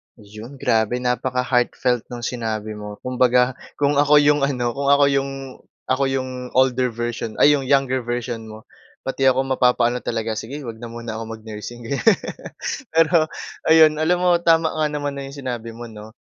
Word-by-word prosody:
'Yon, 110 Hz, +4 st, -11 dB
grabe 110 Hz, -3 st, +1 dB
napaka-heartfelt 125 Hz, -1 st, 0 dB
ng 120 Hz, -1 st, -8 dB
sinabi 110 Hz, -3 st, -3 dB
mo. 105 Hz, 0 st, -7 dB
Kumbaga 125 Hz, 0 st, +3 dB, 0.2 s
kung 145 Hz, 0 st, +1 dB
ako 145 Hz, +1 st, +5 dB
yung 150 Hz, 0 st, +4 dB
ano, 125 Hz, -3 st, -1 dB
kung 140 Hz, +3 st, -3 dB
ako 140 Hz, 0 st, +5 dB
yung 135 Hz, 0 st, 0 dB, 0.6 s
ako 130 Hz, +1 st, +1 dB
yung 135 Hz, -1 st, -2 dB, 0.3 s
older 130 Hz, -1 st, +3 dB
version 120 Hz, -1 st, -4 dB
ay, 145 Hz, -, +7 dB
yung 135 Hz, -2 st, -4 dB
younger 135 Hz, -1 st, +2 dB
version 120 Hz, -1 st, -4 dB
mo, 110 Hz, 0 st, -11 dB, 0.4 s
pati 135 Hz, 0 st, -3 dB
ako 130 Hz, 0 st, +3 dB
mapapaano 125 Hz, -1 st, +2 dB
talaga, 115 Hz, -1 st, -2 dB
"Sige, 140 Hz, +6 st, -7 dB
'wag 115 Hz, -3 st, -7 dB
na 120 Hz, -, -6 dB
muna 115 Hz, -1 st, -6 dB
ako 115 Hz, 0 st, -6 dB
mag-nursing," 110 Hz, +2 st, -9 dB
ganyan. 190 Hz, +10 st, +3 dB, 0.8 s
Pero 165 Hz, 0 st, +4 dB, 0.4 s
ayun, 160 Hz, -1 st, +6 dB
alam 175 Hz, +3 st, +2 dB
mo, 180 Hz, -, +4 dB
tama 165 Hz, -1 st, +4 dB
nga 155 Hz, -1 st, 0 dB
naman 145 Hz, -1 st, -3 dB
na 140 Hz, -, -5 dB
yung 140 Hz, -, -10 dB
sinabi 120 Hz, -4 st, -5 dB
mo, 120 Hz, +1 st, -8 dB
'no, 105 Hz, 0 st, -11 dB
125 Hz, 170 wpm, -21 LUFS, 115-140 Hz, 0.8 s, ay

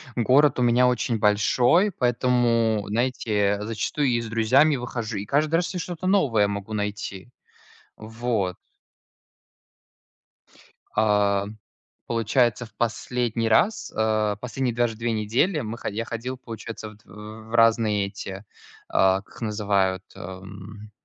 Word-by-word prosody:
Город 130 Hz, +3 st, +4 dB
у -, -, +1 dB
меня 120 Hz, +1 st, +4 dB
очень 120 Hz, -1 st, 0 dB
большой, 125 Hz, -, +3 dB
поэтому, 120 Hz, -, +1 dB
знаете, 105 Hz, -3 st, 0 dB
зачастую 115 Hz, +6 st, -1 dB
и 120 Hz, -2 st, +1 dB
с 115 Hz, -, -6 dB
друзьями 130 Hz, +7 st, +3 dB
выхожу, 120 Hz, -4 st, -4 dB
и 100 Hz, -, -4 dB
каждый 150 Hz, +5 st, +1 dB
раз 175 Hz, +3 st, 0 dB
я 180 Hz, -, -3 dB
что-то 175 Hz, +1 st, -5 dB
новое 125 Hz, -, +3 dB
могу 100 Hz, +1 st, -5 dB
найти. 105 Hz, 0 st, -4 dB, 0.7 s
Вот. 110 Hz, -4 st, -2 dB, 2.4 s
А, 105 Hz, -2 st, +2 dB, 0.6 s
получается, 120 Hz, 0 st, +1 dB
в -, -, -22 dB
последний 120 Hz, -1 st, -1 dB
раз, 195 Hz, -, +2 dB
э, 110 Hz, -2 st, +1 dB
последние 125 Hz, -1 st, -2 dB
даже 120 Hz, -2 st, 0 dB
две 115 Hz, 0 st, -2 dB
недели 120 Hz, -, +1 dB
мы 115 Hz, 0 st, -5 dB
хо -, -, -4 dB
я 110 Hz, +3 st, -3 dB
ходил, 125 Hz, +3 st, -5 dB
получается, 115 Hz, -2 st, -8 dB
вот 105 Hz, +1 st, -19 dB
в 110 Hz, +2 st, -11 dB
разные 110 Hz, -3 st, +3 dB
эти, 100 Hz, 0 st, -8 dB, 0.4 s
а, 95 Hz, +1 st, +3 dB
как -, -, -21 dB
их -, -, -12 dB
называют, 100 Hz, -3 st, 0 dB
эм, 100 Hz, +3 st, -10 dB
115 Hz, 130 wpm, -24 LUFS, 105-125 Hz, 2.4 s, Город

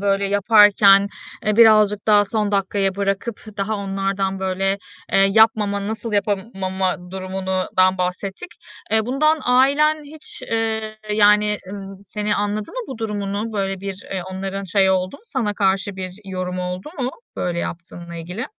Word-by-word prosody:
böyle 200 Hz, 0 st, +1 dB
yaparken, 200 Hz, -1 st, +5 dB, 0.4 s
eee, 210 Hz, -, +2 dB
birazcık 215 Hz, -3 st, +5 dB
daha 210 Hz, -1 st, +5 dB
son 210 Hz, 0 st, -1 dB
dakikaya 195 Hz, -1 st, 0 dB
bırakıp 200 Hz, +3 st, -2 dB, 0.2 s
daha 205 Hz, +2 st, -1 dB
onlardan, 195 Hz, -1 st, -2 dB
böyle, 190 Hz, +1 st, 0 dB, 0.3 s
eee, -, -, +4 dB
yapmama, 205 Hz, -2 st, +3 dB
nasıl 220 Hz, +1 st, -4 dB
yapamama 190 Hz, -3 st, -2 dB
durumundan 185 Hz, 0 st, 0 dB
bahsettik. 190 Hz, -, -3 dB, 0.4 s
Eee, 220 Hz, 0 st, +2 dB
bundan 305 Hz, +5 st, +2 dB
ailen 285 Hz, +5 st, +3 dB
hiç, 300 Hz, +1 st, -12 dB
ııı, 220 Hz, -1 st, -1 dB, 0.2 s
yani, 210 Hz, 0 st, +4 dB
ııı, 195 Hz, -1 st, -8 dB
seni 210 Hz, +1 st, -2 dB
anladı 205 Hz, +1 st, -2 dB
mı -, -, -5 dB
bu 260 Hz, -4 st, -7 dB
durumunu? 210 Hz, 0 st, -3 dB
Böyle 195 Hz, -2 st, -2 dB
bir, 195 Hz, 0 st, -6 dB
eee, 185 Hz, -2 st, -2 dB
onların 195 Hz, +1 st, -4 dB
şeyi 190 Hz, +1 st, +3 dB
oldu 185 Hz, +5 st, 0 dB
mu, -, -, -24 dB
sana 235 Hz, -, -2 dB
karşı 195 Hz, 0 st, 0 dB
bir 185 Hz, -1 st, -6 dB
yorumu 185 Hz, -1 st, -4 dB
oldu 180 Hz, +9 st, -5 dB
mu 255 Hz, 0 st, -1 dB, 0.3 s
böyle 175 Hz, -1 st, -2 dB
yaptığınla 170 Hz, 0 st, -6 dB
ilgili? 180 Hz, -, -5 dB
200 Hz, 145 wpm, -21 LUFS, 190-215 Hz, 0.4 s, yaparken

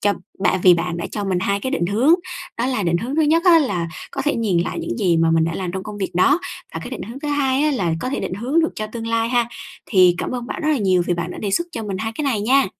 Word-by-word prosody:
cho 205 Hz, 0 st, +3 dB, 0.3 s
bạn 185 Hz, -1 st, +2 dB
vì 180 Hz, -2 st, +8 dB
bạn 170 Hz, 0 st, -2 dB
đã 170 Hz, -, -3 dB
cho 205 Hz, -, -3 dB
mình 190 Hz, -2 st, 0 dB
hai 200 Hz, +2 st, 0 dB
cái 260 Hz, -, -3 dB
định 175 Hz, -, 0 dB
hướng. 235 Hz, -, +4 dB, 0.4 s
Đó 235 Hz, -, +1 dB
là 255 Hz, -5 st, -1 dB
định 170 Hz, -1 st, +1 dB
hướng 255 Hz, -, -4 dB
thứ 320 Hz, -, +4 dB
nhất 320 Hz, +3 st, +3 dB
á 350 Hz, -3 st, +7 dB
là 180 Hz, -, -1 dB, 0.2 s
có -, -, -3 dB
thể 295 Hz, 0 st, +1 dB
nhìn 210 Hz, -7 st, +1 dB
lại 170 Hz, -, -2 dB
những 115 Hz, -, -4 dB
gì 175 Hz, -3 st, +2 dB
mà 165 Hz, 0 st, +3 dB
mình 165 Hz, 0 st, +3 dB
đã 165 Hz, 0 st, -2 dB
làm 180 Hz, -2 st, -3 dB
trong 190 Hz, 0 st, -4 dB
công 210 Hz, +1 st, -8 dB
việc 190 Hz, -, -2 dB
đó, 275 Hz, -, +4 dB, 0.4 s
và -, -, -3 dB
cái -, -, -7 dB
định -, -, -5 dB
hướng 240 Hz, +4 st, -8 dB
thứ 295 Hz, -, -4 dB
hai 280 Hz, -1 st, +1 dB
á 305 Hz, -, +3 dB
là 180 Hz, -, 0 dB
có -, -, -2 dB
thể -, -, -2 dB
định -, -, -3 dB
hướng 255 Hz, -, +1 dB
được 325 Hz, -, 0 dB
cho 215 Hz, -, -4 dB
tương 225 Hz, +1 st, -6 dB
lai 230 Hz, 0 st, +1 dB
ha. 245 Hz, 0 st, +3 dB, 0.4 s
Thì 185 Hz, -4 st, +5 dB
cảm -, -, -3 dB
ơn 245 Hz, -1 st, -4 dB
bạn -, -, -5 dB
rất 310 Hz, -, 0 dB
là 300 Hz, -, +2 dB
nhiều 185 Hz, -4 st, +2 dB
vì 175 Hz, -, +1 dB
bạn 170 Hz, 0 st, -3 dB
đã -, -, -7 dB
đề 205 Hz, -, -2 dB
xuất 340 Hz, -, +1 dB
cho 230 Hz, -, -4 dB
mình 195 Hz, -2 st, -4 dB
hai 225 Hz, +3 st, -3 dB
cái 300 Hz, -, -3 dB
này 245 Hz, -7 st, 0 dB
nha! 265 Hz, +6 st, +3 dB
215 Hz, 320 wpm, -21 LUFS, 180-270 Hz, 0.4 s, vì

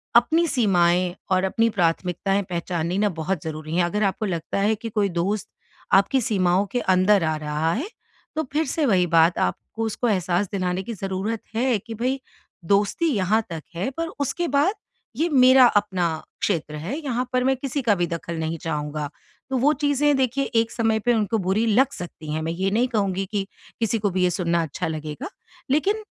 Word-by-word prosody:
अपनी 320 Hz, +8 st, +4 dB
सीमाएँ 180 Hz, -, +2 dB, 0.2 s
और 185 Hz, 0 st, +3 dB
अपनी 225 Hz, +4 st, +2 dB
प्राथमिकताएँ 185 Hz, +2 st, 0 dB
पहचाननी 175 Hz, 0 st, -2 dB
ना, 210 Hz, -1 st, +3 dB
बहुत 170 Hz, 0 st, -3 dB
ज़रूरी 155 Hz, 0 st, -5 dB
हैं। 180 Hz, -, +4 dB
अगर 210 Hz, +5 st, -1 dB
आपको 200 Hz, +2 st, 0 dB
लगता 170 Hz, 0 st, -2 dB
है 210 Hz, +2 st, +2 dB
कि 225 Hz, +2 st, -6 dB
कोई 205 Hz, -2 st, +1 dB
दोस्त 180 Hz, +4 st, -2 dB, 0.4 s
आपकी 225 Hz, +7 st, +4 dB
सीमाओं 190 Hz, -3 st, +2 dB
के 245 Hz, -, 0 dB
अंदर 185 Hz, 0 st, +3 dB
आ 160 Hz, 0 st, 0 dB
रहा 150 Hz, +2 st, -1 dB
है, 310 Hz, -, -3 dB, 0.5 s
तो 315 Hz, -, 0 dB
फिर 315 Hz, +2 st, +1 dB
से 300 Hz, +2 st, 0 dB
वही 180 Hz, -4 st, +3 dB
बात 165 Hz, +1 st, +4 dB
आपको 220 Hz, -, -2 dB
उसको 225 Hz, +2 st, -1 dB
एहसास 185 Hz, 0 st, +1 dB
दिलाने 185 Hz, -1 st, -1 dB
की 230 Hz, -, -5 dB
ज़रूरत 195 Hz, +3 st, -3 dB
है 245 Hz, 0 st, +2 dB
कि 225 Hz, +3 st, -9 dB
भई, 255 Hz, +4 st, -1 dB, 0.5 s
दोस्ती 200 Hz, -, +2 dB
यहाँ 210 Hz, +1 st, +2 dB
तक 160 Hz, -2 st, -6 dB
है, 180 Hz, +8 st, -1 dB
पर 330 Hz, +4 st, -3 dB
उसके 335 Hz, +5 st, -1 dB
बाद 290 Hz, +9 st, +2 dB, 0.4 s
ये 325 Hz, +4 st, +2 dB
मेरा 260 Hz, -2 st, +7 dB
अपना 205 Hz, -5 st, +1 dB, 0.4 s
क्षेत्र 160 Hz, -6 st, -1 dB
है। 170 Hz, -, -4 dB
यहाँ 255 Hz, -4 st, -2 dB
पर 250 Hz, 0 st, +2 dB
मैं 265 Hz, +1 st, +3 dB
किसी 275 Hz, +1 st, -3 dB
का 225 Hz, -4 st, +3 dB
भी 175 Hz, -, +1 dB
दखल 170 Hz, 0 st, -5 dB
नहीं 160 Hz, +1 st, -2 dB
चाहूँगा। 150 Hz, -2 st, -3 dB, 0.4 s
तो 265 Hz, -, 0 dB
वो 280 Hz, +5 st, +4 dB
चीज़ें, 290 Hz, 0 st, +2 dB
देखिए, 265 Hz, +1 st, +1 dB
एक 225 Hz, -1 st, +1 dB
समय 225 Hz, -1 st, +1 dB
पे 240 Hz, +3 st, +2 dB
उनको 220 Hz, 0 st, +1 dB
बुरी 195 Hz, +4 st, +1 dB
लग 250 Hz, +5 st, +3 dB
सकती 160 Hz, -3 st, -7 dB
हैं। 155 Hz, -, -2 dB
मैं 165 Hz, -, -2 dB
ये 190 Hz, +3 st, -1 dB
नहीं 240 Hz, +4 st, +2 dB
कहूँगी 195 Hz, -5 st, -1 dB
कि 200 Hz, -2 st, -1 dB, 0.3 s
किसी 225 Hz, -1 st, 0 dB
को 205 Hz, -1 st, +1 dB
भी 185 Hz, 0 st, 0 dB
ये 180 Hz, -, +4 dB
सुनना 170 Hz, -2 st, 0 dB
अच्छा 160 Hz, 0 st, -4 dB
लगेगा। 155 Hz, -, -5 dB, 0.4 s
लेकिन 405 Hz, +9 st, +1 dB
200 Hz, 195 wpm, -23 LUFS, 175-240 Hz, 0.5 s, मेरा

